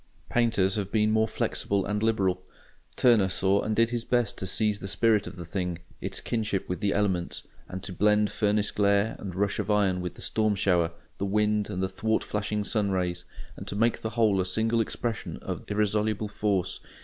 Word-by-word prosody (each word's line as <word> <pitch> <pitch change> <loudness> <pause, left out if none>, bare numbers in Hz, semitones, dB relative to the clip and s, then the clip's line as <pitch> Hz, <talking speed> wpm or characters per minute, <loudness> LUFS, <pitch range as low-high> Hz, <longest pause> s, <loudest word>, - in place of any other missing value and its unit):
Painters 110 -5 +2
have 100 -2 -3
been 110 -1 +2
more 110 0 +3
flexible 100 -2 -1
and 105 +1 -1
liberal. 95 -5 +1 0.5
Turner 115 -6 +4
saw 95 +2 +2
and 110 - -1
did 115 +1 +3
his 120 -1 -2
best 120 -3 +1
to 95 - -3
seize 105 +1 +1
the 100 - -6
spirit 105 +1 +2
of 90 - -8
the 85 -1 -7
thing, 90 0 -3 0.2
its - - -2
kinship 110 -4 -2
with 90 - -3
the 100 0 +1
elements, 95 -4 -1 0.3
and 95 +1 -6
to 95 - -5
blend 105 +2 +3
furnace 105 0 +1
glare 100 +1 +2
and 95 -3 -6
rush 100 +2 0
of 105 0 -2
iron 100 -3 +2
with 90 -1 -5
the - - -12
storm 110 -1 +1
shower, 90 -3 +2 0.3
the 100 - 0
wind 105 +1 +1
and 95 -2 -2
the - - +2
thwart 110 +4 -1
flashing 105 0 -2
sun 105 -1 0
rays, 90 -2 -1 0.3
and - - -9
to - - -4
make 115 +3 +1
the 110 - -2
whole 105 -4 +4
a - - -1
single 115 +4 +2
expression 115 0 -3
of - - -5
irresoluble 105 +1 0
force. 100 -4 -1
105 Hz, 200 wpm, -27 LUFS, 95-110 Hz, 0.5 s, Turner